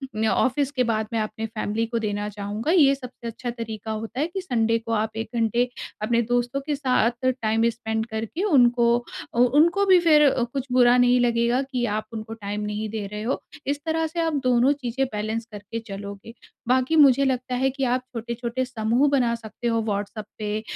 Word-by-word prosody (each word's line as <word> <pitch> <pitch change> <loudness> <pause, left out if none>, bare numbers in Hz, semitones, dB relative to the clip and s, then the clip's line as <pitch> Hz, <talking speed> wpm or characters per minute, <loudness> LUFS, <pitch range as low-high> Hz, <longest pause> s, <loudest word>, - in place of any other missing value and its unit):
न 220 +1 +1
ऑफ़िस 270 +4 +1
के 255 -3 +1
बाद 220 -2 -1
मैं 225 - +1
अपने 220 +1 -4
फैमिली 225 0 -2
को 230 0 -2
देना 205 -1 -2
चाहूँगा। 205 - -3
ये 280 -6 +5
सबसे 250 -3 -9
अच्छा 235 +2 -5
तरीका 225 -2 -5
होता 225 +4 -5
है, 305 - +1
कि 375 +3 -5
संडे 230 -6 +1
को 230 0 -7
आप 215 0 -1
1 225 - -4
घंटे 235 +2 +1 0.3
अपने 235 +2 +2
दोस्तों 245 +3 0
के 295 - -1
साथ 245 -2 +3
टाइम 230 -3 +1
स्पेंड 220 -1 -3
करके 225 - -4
उनको 245 - +4 0.5
अ - - +1
उनको 310 +11 +4
भी 375 -2 +6
फिर 300 -4 +5 0.2
कुछ 270 -2 -2
बुरा 250 0 +5
नहीं 245 0 +4
लगेगा 240 +1 +2
कि 260 -3 -2
आप 215 0 -2
उनको 220 0 -6
टाइम 205 -1 -5
नहीं 210 +1 -3
दे 215 -1 -4
रहे 210 0 -5
हो। 250 - -1 0.3
इस 285 +1 0
तरह 320 0 0
से 335 +2 -5
आप 325 -1 0
दोनों 250 +2 +4
चीज़ें 265 -1 -2
बैलेंस 215 +2 -2
करके 210 +2 -6
चलोगे। 200 +2 -8 0.3
बाकी 255 +5 +2
मुझे 275 -2 +6
लगता 255 -1 -1
है, 265 +2 +2
कि 270 +1 -4
आप 250 0 +1
छोटे-छोटे 235 +2 -3
समूह 245 +3 +1
बना 250 -4 +2
सकते 230 +1 -6
हो, 230 -1 +1
व्हाट्सएप 205 0 -3
पे 210 0 -2
235 Hz, 195 wpm, -24 LUFS, 220-260 Hz, 0.5 s, भी